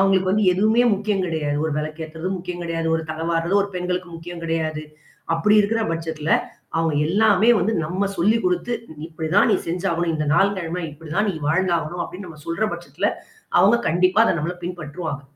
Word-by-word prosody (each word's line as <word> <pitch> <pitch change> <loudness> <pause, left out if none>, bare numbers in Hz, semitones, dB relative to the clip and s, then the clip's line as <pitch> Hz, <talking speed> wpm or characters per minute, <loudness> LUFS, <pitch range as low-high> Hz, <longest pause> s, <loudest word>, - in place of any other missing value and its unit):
அவங்களுக்கு 190 -1 +3
வந்து 210 +2 +2
எதுவுமே 220 +6 +3
முக்கியம் 200 -1 -1
கிடையாது. 150 -3 -1
ஒரு 160 - -1
விளக்கு 155 +1 -4
ஏத்தறது 160 +3 -5
முக்கியம் 180 0 -6
கிடையாது. 165 -1 -2
ஒரு 160 - -3
தலை 160 +1 -4
வார்றது 165 +3 0
ஒரு 200 - -4
பெண்களுக்கு 180 0 -2
முக்கியம் 170 +1 -8
கிடையாது. 160 -2 -2 0.5
அப்படி 185 +6 +3
இருக்கிற 225 +3 +1
பட்சத்தில, 160 -2 -4 0.5
அவங்க 165 -1 +1
எல்லாமே 210 +3 +4
வந்து 200 +5 +1
நம்ம 185 +5 -1
சொல்லிக் 210 +5 +2
குடுத்து, 180 +6 0 0.3
"இப்படிதான் 160 +4 +1
நீ - - +4
செஞ்சாகணும். 170 -1 -1
இந்த 155 -1 -2
நாள், 200 +6 +4
கிழமை 175 0 -3
இப்படிதான் 165 +7 -2
நீ - - -5
வாழ்ந்தாகணும்." 170 0 0
அப்படின்னு 185 +1 -8
நாம் 155 -3 -13
சொல்ற 170 +6 0
பட்சத்தில, - - -3 0.5
அவங்க 205 +5 +6
கண்டிப்பா 185 +5 +3
அதை - - +3
நம்மள 165 +4 -2
பின்பற்றுவாங்க. 160 -4 -5
175 Hz, 170 wpm, -22 LUFS, 160-195 Hz, 0.5 s, அவங்க